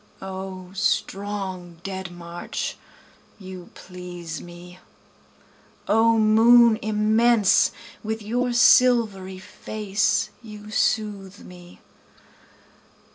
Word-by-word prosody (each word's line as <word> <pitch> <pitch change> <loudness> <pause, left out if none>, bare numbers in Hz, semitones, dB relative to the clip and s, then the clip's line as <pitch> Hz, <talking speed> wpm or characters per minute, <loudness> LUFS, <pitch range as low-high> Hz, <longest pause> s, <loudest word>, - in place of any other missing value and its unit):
O 190 -1 -8
strong 195 -3 -3
dead 190 -1 -5
march 175 0 -6 0.6
you 185 -2 -10
please 175 -3 -8
me! 175 +1 -13 1.1
O 225 +2 +3
moon 225 +1 +5
immense 215 0 +3 0.3
with 220 0 -4
your 245 +4 -1
silvery 230 -6 +3
face 205 +2 -2
you 210 -2 -11
soothe 205 -3 -1
me! 180 -1 -14
200 Hz, 80 wpm, -23 LUFS, 185-220 Hz, 1.1 s, moon